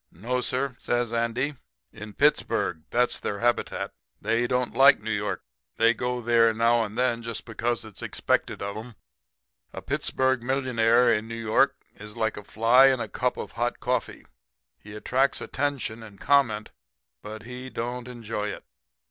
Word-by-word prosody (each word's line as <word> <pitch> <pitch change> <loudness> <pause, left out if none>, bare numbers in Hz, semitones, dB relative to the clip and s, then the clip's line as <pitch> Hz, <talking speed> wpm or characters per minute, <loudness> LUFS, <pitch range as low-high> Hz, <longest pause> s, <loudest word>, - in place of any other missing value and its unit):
"'No, 120 +9 -2
sir,' 130 +1 -1
says 120 -1 -1
Andy, 120 +5 0 0.4
'in 105 0 -9
Pittsburg. 90 - +1
That's 125 +1 +1
their 100 - -3
habitat. 120 +2 -1 0.3
They 115 +3 +1
don't 125 0 0
like 135 +3 +7
New 110 +1 -4
York. 105 -3 -2 0.3
They 115 +1 +5
go 125 +1 -2
there 115 -1 +4
now 115 +1 +3
and 105 +1 -6
then 125 -2 +1
just 115 -1 -5
because 120 +1 -2
it's 110 -3 -12
expected - - -1
of 100 0 -4
'em.' 115 +2 -8 0.8
"'A - - -7
Pittsburg 130 -1 0
millionaire 120 -2 +3
in 110 0 -1
New 115 - -6
York 115 +5 +3 0.2
is 105 0 -11
like 110 -1 0
a 105 - -8
fly 115 +6 +5
in 130 -2 +3
a 115 - -3
cup 125 +4 -1
of - - -6
hot 120 +1 -2
coffee 125 -2 -2 0.5
he 105 0 -11
attracts 130 +5 +1
attention 140 -6 -3
and 105 -3 -12
comment, 120 -7 +2 0.5
but 110 +1 -8
he 125 +2 -8
don't 120 0 -4
enjoy 115 -4 -4
it. - - -6
115 Hz, 165 wpm, -26 LUFS, 110-125 Hz, 0.8 s, like